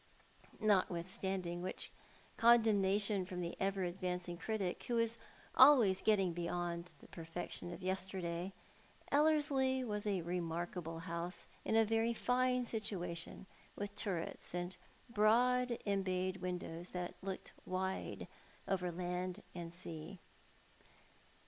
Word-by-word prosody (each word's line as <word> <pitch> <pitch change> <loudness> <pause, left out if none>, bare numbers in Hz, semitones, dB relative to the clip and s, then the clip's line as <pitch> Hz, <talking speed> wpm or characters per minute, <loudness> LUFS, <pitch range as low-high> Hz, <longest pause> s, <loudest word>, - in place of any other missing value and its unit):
Notwithstanding 185 -3 0
which 185 - -4 0.4
condemnation 210 -3 +4
from 180 0 -5
the 170 0 -3
ever 195 0 +1
advancing 180 0 -2
critic, 195 -1 -2
who 240 - 0
is 230 0 +1 0.3
always 250 -9 +8
getting 195 -5 +3
beyond 175 0 -2
the - - -14
perfection 170 +1 -5
of 185 - -8
yesterday, 185 -1 -2 0.6
Ellerslie 285 -3 +3
was 210 -3 -2
a 195 -4 +1
remarkable 170 -1 -3
house 170 +1 -4 0.2
in - - +1
a 225 0 +6
very 225 +2 +2
fine 250 +1 +2
situation, 185 -6 -4 0.3
with 205 0 -4
turrets 180 -4 -3
and 175 +1 -2 0.3
broad 240 +2 +4
embayed 185 -2 0
windows 180 -1 -4
that 180 -1 -3
looked 190 -1 -5
wide 190 +1 -2 0.4
over 180 -2 0
land 180 +1 -3
and 170 -2 -5
sea. 170 +1 -7
190 Hz, 110 wpm, -37 LUFS, 175-220 Hz, 0.6 s, always